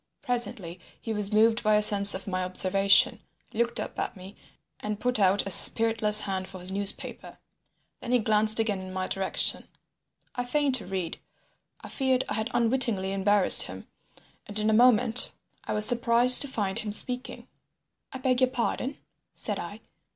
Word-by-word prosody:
Presently 225 -9 -4 0.2
he 225 - -8
was 210 -1 +2
moved 225 +2 0
by 215 -2 -1
a 210 - +2
sense 200 -1 +7
of 190 - -10
my 185 -2 -6
observation, 195 +2 +1 0.3
looked 235 +1 -4
up - - -9
at - - -7
me, 185 +2 -15 0.4
and 210 0 -8
put 250 -2 -3
out 195 0 -1
a 195 - -5
spiritless 220 +1 +4
hand 190 -1 -6
for 190 - -13
his 180 +1 0
newspaper. 200 +1 -5 0.6
Then 245 - -9
he 250 - +1
glanced 215 -1 +2
again 215 -3 -4
in 185 0 -12
my 185 0 -6
direction. 195 -1 +1 0.7
I 245 - -6
feigned 280 +2 -3
to 250 -7 -3
read. 185 -3 -8 0.6
I - - -13
feared 260 -2 -3
I - - -6
had 220 +2 -5
unwittingly 230 -6 -2
embarrassed 195 0 +6
him, - - -9 0.6
and 205 - -7
in 215 +1 -2
a - - -2
moment 235 0 +1 0.3
I - - -6
was 210 0 +2
surprised 240 +1 +5
to 285 - +3
find 205 -7 -6
him 215 - -8
speaking. 250 +4 -3 0.6
"I - - -10
beg 255 -1 -3
your 255 - 0
pardon?" 255 +2 -6 0.4
said - - -6
I. - - -11
215 Hz, 175 wpm, -23 LUFS, 195-240 Hz, 0.7 s, sense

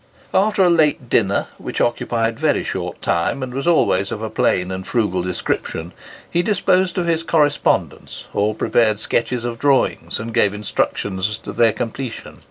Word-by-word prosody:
After 200 0 +3
a 180 - +5
late 150 -6 +2
dinner, 100 -5 +1
which - - -5
occupied 115 -1 0
very - - +1
short - - -5
time 85 +11 0
and 125 -1 -5
was 135 +5 -3
always 100 - +2
of - - -3
a 110 - -4
plain 90 -4 +1
and 95 0 -5
frugal 105 -7 0
description, 90 -1 -3 0.3
he 175 - +1
disposed 185 -2 +1
of 180 - +1
his 165 -1 +1
correspondence, 150 -3 0
or 105 +1 +1
prepared 110 -2 +2
sketches 120 +2 -1
of 115 -1 -4
drawings, 140 -1 +1
and 115 +1 -6
gave 105 -3 +2
instructions 100 -1 -1
as 105 - -4
to - - -8
their 115 -1 +4
completion. 120 +2 -6
115 Hz, 170 wpm, -20 LUFS, 105-150 Hz, 0.3 s, a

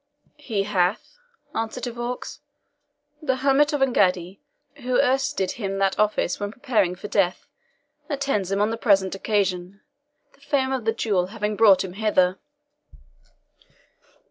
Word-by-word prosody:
"He 225 -9 -2
hath," 195 - -1 0.3
answered 225 +2 -3
De 245 - -2
Vaux; 240 +1 -5 0.8
"the 265 -4 0
hermit 275 +3 +3
of 290 -2 -1
Engaddi, 190 -7 +1 0.4
who 250 -2 0
erst 270 +1 +1
did 190 -1 0
him 195 -4 -4
that 195 -1 0
office 210 -4 +1
when 205 0 -3
preparing 220 -8 0
for 195 - -8
death, 195 -3 0 0.6
attends 275 - -1
him 195 +1 +1
on 210 +2 +2
the 225 - -3
present 195 -5 +2
occasion, 195 -2 -1 0.5
the - - -27
fame 275 -2 0
of 260 -4 -2
the 225 - +3
duel 200 -5 0
having 210 +1 -3
brought 200 -4 +5
him 185 -2 -7
hither." 190 -3 +1
210 Hz, 145 wpm, -24 LUFS, 195-250 Hz, 0.8 s, brought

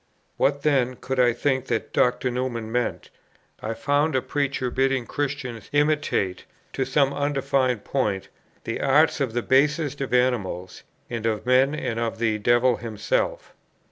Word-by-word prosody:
"What, 140 0 +1
then, 130 -4 +2
could 130 +1 -4
I 125 -1 +5
think 130 +2 -1
that 115 -2 -2
Dr. 125 0 +2
Newman 120 -3 -3
meant? 120 0 -2 0.5
I 110 +1 -3
found 145 +6 +1
a 130 - +2
preacher 135 -3 -1
bidding 135 -1 +1
Christians 135 -6 -4
imitate, 145 -11 +1 0.3
to 130 - -1
some 135 +1 +2
undefined 135 -4 0
point, 105 -8 -1 0.4
the - - -3
'arts' 150 +4 +3
of 130 -5 -1
the 120 0 -1
basest 145 +1 +2
of 135 - -3
animals, 115 -8 0 0.3
and 115 -1 -3
of 110 -1 -2
men, 130 +3 +4
and 120 -6 -3
of 115 -1 -2
the 110 -2 0
devil 120 +2 +3
himself. - - -2
130 Hz, 150 wpm, -24 LUFS, 115-140 Hz, 0.5 s, I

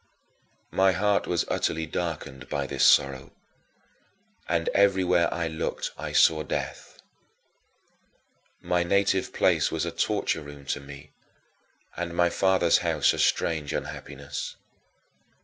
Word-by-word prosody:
9. - - -12
My 95 0 +6
heart 100 +3 +1
was 85 -1 0
utterly 80 0 -1
darkened 80 -5 -5
by 70 -1 -2
this 70 -1 -1
sorrow 70 0 +3 1.2
and 85 -1 0
everywhere 95 -3 +3
I 85 -1 -2
looked 80 -1 -3
I - - -6
saw 80 -1 +4
death. 75 - -5 1.6
My 90 0 0
native 95 +1 +1
place - - +2
was - - -1
a - - -3
torture 80 - -1
room 70 -1 -11
to - - -5
me 70 0 -12 0.8
and 85 0 -4
my 85 -1 +3
father's 95 -3 +3
house 80 -4 +2
a - - -5
strange 75 -3 0
unhappiness. 70 0 -6
85 Hz, 125 wpm, -26 LUFS, 70-90 Hz, 1.6 s, My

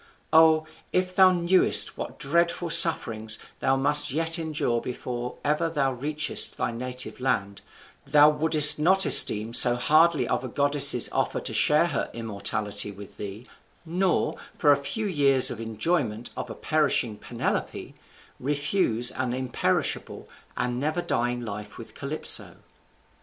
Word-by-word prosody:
O, 160 0 +4 0.3
if 185 0 -2
thou 190 -1 +5
knewest 180 +1 +2
what - - -8
dreadful 170 +3 -1
sufferings 115 -10 +3 0.2
thou 135 - 0
must 145 +2 +2
yet 165 +3 +1
endure 150 -7 -2
before 125 0 -7
ever 150 +3 0
thou 140 -4 -1
reachest 150 +5 -2
thy - - -2
native 125 +2 -5
land, 100 -6 -3 0.5
thou 150 0 +5
wouldest 150 0 +6
not 190 +5 +3
esteem 110 +2 +5
so 120 0 +6
hardly 155 +1 +2
of - - -2
a - - -5
goddess's 140 -1 +2
offer - - -2
to - - -4
share - - +2
her - - -3
immortality 105 -2 -3
with 100 0 -13
thee; 105 +3 -9 0.4
nor, 180 +2 -1 0.2
for 145 - +2
a - - +5
few 210 +11 -3
years' 140 -8 +3
enjoyment 115 +1 -3
of - - -7
a - - -8
perishing 145 -8 -1
Penelope, - - -5 0.5
refuse 145 - -1
an 130 -2 -4
imperishable 130 -1 -3 0.3
and 125 0 -3
never 155 +5 -3
dying 120 +1 -2
life 105 -2 -8
with 115 - -12
Calypso." 145 +2 -2
140 Hz, 135 wpm, -24 LUFS, 120-160 Hz, 0.5 s, wouldest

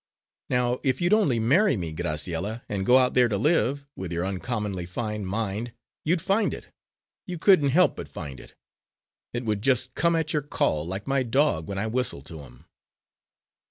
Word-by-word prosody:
Now, 125 0 +1
if 130 -2 0
you'd 175 +3 +2
only 180 - +3
marry 145 - +3
me, 85 -4 -4
Graciella, 85 +7 -2
and 95 -2 -3
go 125 - +7
out 125 -1 +3
there 125 -1 +5
to 105 - 0
live, 140 - +1
with 95 -2 -6
your 85 +1 -1
uncommonly 100 -2 -3
fine 105 +1 -4
mind, 110 +3 -3 0.3
you'd 165 +1 +1
find 200 +3 +1
it - - -12 0.6
you 180 -1 -4
couldn't 160 -5 +5
help 180 +7 +4
but - - -7
find 70 -3 -7
it. - - -15 0.8
It 120 0 -4
would 105 -2 -1
just 130 0 +1
come 170 0 +2
at 160 -1 -1
your 150 - +1
call, 80 - -1
like 95 +3 -5
my 135 0 +1
dog 125 - +1
when 100 - -4
I 100 - -1
whistle 115 - -2
to 80 +2 -9
him." 65 +1 -14
115 Hz, 185 wpm, -26 LUFS, 95-140 Hz, 0.8 s, go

